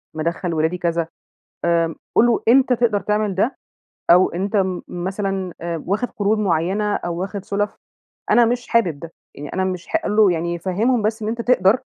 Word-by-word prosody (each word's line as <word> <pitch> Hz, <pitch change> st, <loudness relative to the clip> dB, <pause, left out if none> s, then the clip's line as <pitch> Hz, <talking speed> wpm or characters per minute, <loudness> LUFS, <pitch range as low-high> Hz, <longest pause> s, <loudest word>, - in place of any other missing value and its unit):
مدخّل 170 Hz, +2 st, -2 dB
ولادي 160 Hz, +3 st, 0 dB
كذا، 170 Hz, -2 st, -1 dB, 0.6 s
آآ 165 Hz, -1 st, +2 dB, 0.2 s
قل 235 Hz, -, +5 dB
له 235 Hz, -2 st, +1 dB
أنت 260 Hz, +1 st, +5 dB
تقدر 230 Hz, -4 st, +2 dB
تعمل 210 Hz, -1 st, 0 dB
ده 215 Hz, +8 st, 0 dB, 0.5 s
أو 180 Hz, +2 st, +7 dB
أنت 195 Hz, +4 st, -2 dB
م 185 Hz, -2 st, 0 dB
مثلًا 190 Hz, +1 st, -3 dB
آآ 170 Hz, -1 st, -4 dB
واخد 210 Hz, +6 st, 0 dB
قروض 210 Hz, +1 st, 0 dB
معينة، 200 Hz, +2 st, 0 dB
أو 170 Hz, -1 st, -4 dB
واخد 195 Hz, +1 st, -4 dB
سلف، 205 Hz, +1 st, -2 dB, 0.6 s
أنا 240 Hz, -, +6 dB
مش 245 Hz, +1 st, -1 dB
حابب 175 Hz, -11 st, +1 dB
ده 165 Hz, +1 st, -9 dB, 0.2 s
يعني 145 Hz, 0 st, -8 dB
أنا 190 Hz, -, 0 dB
مش 185 Hz, -2 st, -3 dB
حا 325 Hz, -, 0 dB
قل 210 Hz, -, -1 dB
له 210 Hz, -4 st, +6 dB
يعني 170 Hz, +1 st, -2 dB
فهمهم 215 Hz, +8 st, +1 dB
بس 220 Hz, +2 st, -1 dB
إن 210 Hz, -, -3 dB
أنت 235 Hz, +1 st, -2 dB
تقدر 235 Hz, -1 st, +3 dB
195 Hz, 185 wpm, -21 LUFS, 170-215 Hz, 0.6 s, أو